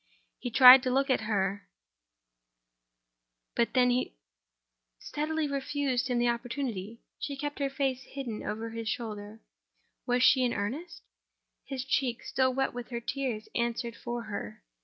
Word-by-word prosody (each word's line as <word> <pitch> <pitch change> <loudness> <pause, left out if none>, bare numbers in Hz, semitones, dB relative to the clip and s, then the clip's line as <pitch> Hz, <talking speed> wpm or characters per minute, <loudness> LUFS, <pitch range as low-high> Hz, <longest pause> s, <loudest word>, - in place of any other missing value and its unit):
He 245 - -4
tried 255 +2 +10
to 255 - -1
look 270 +2 +2
at 260 - +2
her—but - - -6
she 250 - +2 0.8
steadily 310 - -2
refused 275 -2 -1
him 250 -2 0
the 240 0 +2
opportunity: 235 -3 -3 0.2
she 280 0 -4
kept 290 +1 -4
her 280 -1 0
face 270 -2 -1
hidden 260 -4 -6
over 225 +2 -4
his 225 -1 -4
shoulder. 210 0 -5 0.7
Was 245 0 +2
she 260 0 +6
in 245 - +1
earnest? 260 - -4 0.6
His 265 -2 -4
cheek, 260 -3 0
still 260 -1 +1
wet 270 +1 0
with 245 0 -6
her 235 -2 -3
tears, 235 -3 -3
answered 235 0 -1
for 240 0 -5
her. 155 - -6
240 Hz, 140 wpm, -29 LUFS, 205-265 Hz, 0.8 s, tried